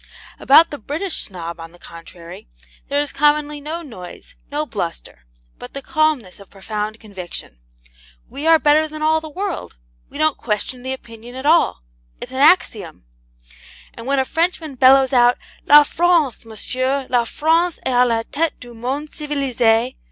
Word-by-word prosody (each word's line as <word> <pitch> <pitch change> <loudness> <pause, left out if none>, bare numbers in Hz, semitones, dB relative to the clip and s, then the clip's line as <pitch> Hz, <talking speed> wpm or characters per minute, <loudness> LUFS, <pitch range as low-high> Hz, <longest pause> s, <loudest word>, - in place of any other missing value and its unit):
About 315 +5 +6
the 290 - -6
British 315 - -3
Snob, 170 -3 -6
on 165 0 -10
the - - -16
contrary, 170 - -12 0.4
there 285 +1 +1
is 290 - -3
commonly 295 0 +1
no 320 +4 -5
noise, 185 - -11 0.2
no 300 +1 -1
bluster, 170 - -6 0.3
but - - -10
the 275 - -5
calmness 305 -13 0
of 200 - -15
profound 210 +2 -5
conviction. 180 - -9 0.7
We 295 +3 -5
are 325 0 +7
better 305 +2 +3
than 310 0 -7
all 315 +1 +2
the 315 - -8
world; 375 - -5 0.3
we - - -10
don't 310 -1 +1
question 240 +3 -3
the 260 +1 -5
opinion 235 -1 -9
at 260 +2 -7
all; 305 - +3 0.4
it's - - -8
an 260 - -5
axiom. 220 - +2 0.9
And 230 +1 -10
when 275 0 +1
a 265 - +2
Frenchman 325 -1 -1
bellows 265 +1 +5
out, 245 -1 +5 0.3
'LA 295 0 +9
FRANCE, 325 -6 +1
MONSIEUR, 255 +5 -2
LA 245 -2 +2
FRANCE 325 +6 +1
EST 255 - 0
A 245 - +6
LA 230 -2 +1
TETE 320 +2 -1
DU 240 -1 -12
MONDE 265 +6 -4
CIVILISE!' 255 -5 0
265 Hz, 165 wpm, -19 LUFS, 225-305 Hz, 0.9 s, LA